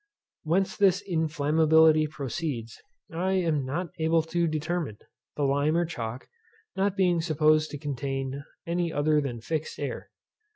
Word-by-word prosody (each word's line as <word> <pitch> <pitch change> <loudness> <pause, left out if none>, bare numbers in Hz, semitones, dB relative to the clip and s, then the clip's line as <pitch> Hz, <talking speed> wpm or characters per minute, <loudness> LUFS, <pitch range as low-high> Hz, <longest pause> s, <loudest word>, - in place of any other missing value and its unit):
Whence 185 +5 0
this 195 -1 +3
inflammability 160 -1 +3
proceeds, 140 -5 -4 0.3
I 185 +3 0
am 165 -6 +1
not 165 +7 -3
able 160 0 +2
to 170 +1 0
determine, 155 -6 -2 0.4
the 145 - -1
lime 145 +3 +2
or 175 - +2
chalk 120 -6 -6 0.5
not 195 +1 0
being 180 -3 +3
supposed 155 -1 +3
to 145 - -6
contain 135 -1 -4 0.2
any 170 0 -1
other 150 0 +2
than 120 -5 -4
fixed 155 +5 -3
air. - - -5
155 Hz, 135 wpm, -27 LUFS, 145-170 Hz, 0.5 s, this